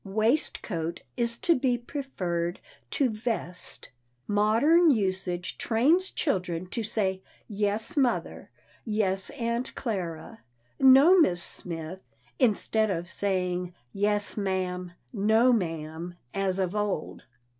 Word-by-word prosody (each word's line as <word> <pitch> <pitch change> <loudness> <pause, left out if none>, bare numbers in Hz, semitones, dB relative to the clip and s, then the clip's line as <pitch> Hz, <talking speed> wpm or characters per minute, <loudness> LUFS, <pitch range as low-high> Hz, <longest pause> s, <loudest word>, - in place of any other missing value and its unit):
"Waistcoat" 195 - -1
is 235 -1 0
to 340 - +3
be 255 -3 +1
preferred 185 - -3 0.3
to 275 - +2
"vest." 215 -5 -4 0.4
Modern 230 +12 +4
usage 190 - -1
trains 305 +12 +3
children 180 - -1
to 230 - -2
say 195 -3 -1 0.3
"Yes, 210 +7 -1
mother," 265 -5 0 0.3
"Yes, 195 -4 0
Aunt 235 +1 -3
Clara," 195 -1 -4 0.4
"No, 275 +8 +8
Miss 175 - +3
Smith," 170 +1 -6 0.4
instead 220 -2 +2
of 175 -2 -3 0.8
"Yes, 205 +1 0
ma'am," 185 -2 -2 0.2
"No, 220 +5 +4
ma'am," 165 -3 -3 0.2
as 195 -1 0
of 190 0 -1
old. 205 -6 -2
205 Hz, 100 wpm, -28 LUFS, 180-235 Hz, 0.8 s, No